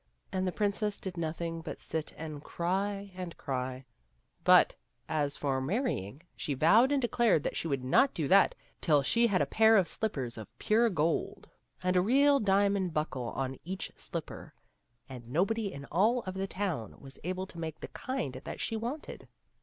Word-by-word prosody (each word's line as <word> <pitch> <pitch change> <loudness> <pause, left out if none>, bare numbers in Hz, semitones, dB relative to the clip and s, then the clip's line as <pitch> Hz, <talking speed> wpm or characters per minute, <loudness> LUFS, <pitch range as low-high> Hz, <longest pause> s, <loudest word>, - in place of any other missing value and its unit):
And 185 0 -1
the - - 0
princess 205 +1 0
did 190 -2 -6
nothing 165 0 -3
but 160 - -7
sit 160 -1 -4
and 155 -2 -7
cry 195 +3 -2
and 180 -2 -6
cry; 130 -1 -4 0.6
but, - - +6 0.3
as 145 -2 -1
for 135 -2 0
marry 225 - 0
ing, 105 - -10
she 145 - -3
vowed 220 - +5
and 285 - +3
declared 235 - +2
that - - -2
she - - -2
would 135 -4 -1
not 260 - +3
do 155 -4 -1
that 195 +5 +5 0.3
till 150 -4 +4
she 235 - +3
had 195 -4 +2
a - - 0
pair 220 0 +5
of 185 -3 +3
slippers 130 - -1
of 110 - -8
pure 230 +2 +3
gold, 165 -3 -1 0.3
and 180 0 +1
a 180 - +5
real 280 +7 +4
diamond 200 -4 +2
buckle 135 -5 -2
on 135 -1 -3
each 190 +3 -5
slipper; - - -7 0.5
and 125 -3 -10
nobody 200 - 0
in 140 0 -8
all 220 +9 +3
of 185 - -5
the 190 +1 -3
town 185 - -3
was 135 0 -11
able 185 +2 -2
to 170 - -11
make 160 -2 -5
the - - -6
kind 255 - -3
that - - -6
she 225 - -2
wanted. 240 +7 -5
180 Hz, 185 wpm, -31 LUFS, 145-210 Hz, 0.6 s, but